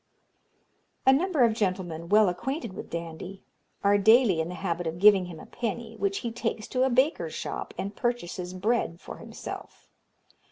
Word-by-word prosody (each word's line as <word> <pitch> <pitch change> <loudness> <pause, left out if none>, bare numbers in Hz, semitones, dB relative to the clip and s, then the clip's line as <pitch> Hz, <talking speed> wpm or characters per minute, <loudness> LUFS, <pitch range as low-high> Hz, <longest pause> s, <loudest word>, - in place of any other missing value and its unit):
"A 265 - +7
number 315 -1 +2
of 230 -2 +4
gentlemen, 180 -6 -2
well 210 0 +6
acquainted 235 - -3
with - - -8
Dandie, 170 +3 -6 0.4
are 205 0 +4
daily 220 -4 +5
in 160 - -3
the 180 - -5
habit 175 -2 -2
of 160 +1 -3
giving 200 -1 +6
him 170 -3 -9
a - - -10
penny, 230 -1 -4
which 200 -2 -1
he 235 - -1
takes 225 -2 -3
to 255 - 0
a 265 - +4
baker's 260 +5 +1
shop - - -4
and 200 +1 -4
purchases 185 -7 -3
bread 190 -3 0
for - - -9
himself. - - -9
205 Hz, 170 wpm, -27 LUFS, 180-240 Hz, 0.4 s, A